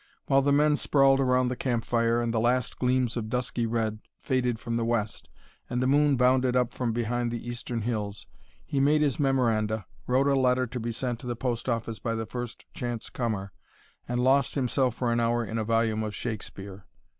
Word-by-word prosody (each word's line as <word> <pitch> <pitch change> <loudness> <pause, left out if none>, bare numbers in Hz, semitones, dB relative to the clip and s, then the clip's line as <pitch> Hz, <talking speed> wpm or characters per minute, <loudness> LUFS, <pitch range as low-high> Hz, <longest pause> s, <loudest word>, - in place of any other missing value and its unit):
While 135 0 +4
the 140 +1 +2
men 150 +1 +4
sprawled 135 -2 +4
around 125 -1 +2
the 125 - -2
campfire 115 -1 0
and 115 -1 -1
the 115 - +1
last 125 +1 0
gleams 125 -2 +1
of 110 -3 -3
dusky 125 -1 -1
red 110 -2 -1 0.2
faded 125 -3 0
from 115 -1 -3
the 115 - 0
west 115 - -2 0.4
and 125 - -1
the 125 - +1
moon 145 +1 +4
bounded 125 0 +3
up 125 -1 +1
from 125 -2 -1
behind 120 +1 -1
the 120 0 -5
eastern 120 -1 -4
hills, 105 -4 -3 0.4
he 140 - -1
made 150 +2 +4
his 145 -2 0
memoranda, 115 -6 +1 0.2
wrote 130 +2 +3
a 140 - +3
letter 130 -1 +3
to 125 +1 -5
be 115 +1 -3
sent 120 0 -3
to 125 - -9
the 120 - -2
post 120 +1 -2
office 115 -1 -2
by 115 -1 -2
the 115 0 -3
first 120 +1 -6
chance 120 -2 -4
comer, 105 -5 -2 0.6
and 120 0 -1
lost 135 +1 +3
himself 130 -2 +1
for 120 -2 0
an 115 - +1
hour 120 0 +1
in 110 +2 -3
a - - 0
volume 115 0 +1
of 110 -1 -4
Shakespeare. 100 -3 -6
120 Hz, 200 wpm, -27 LUFS, 115-130 Hz, 0.6 s, While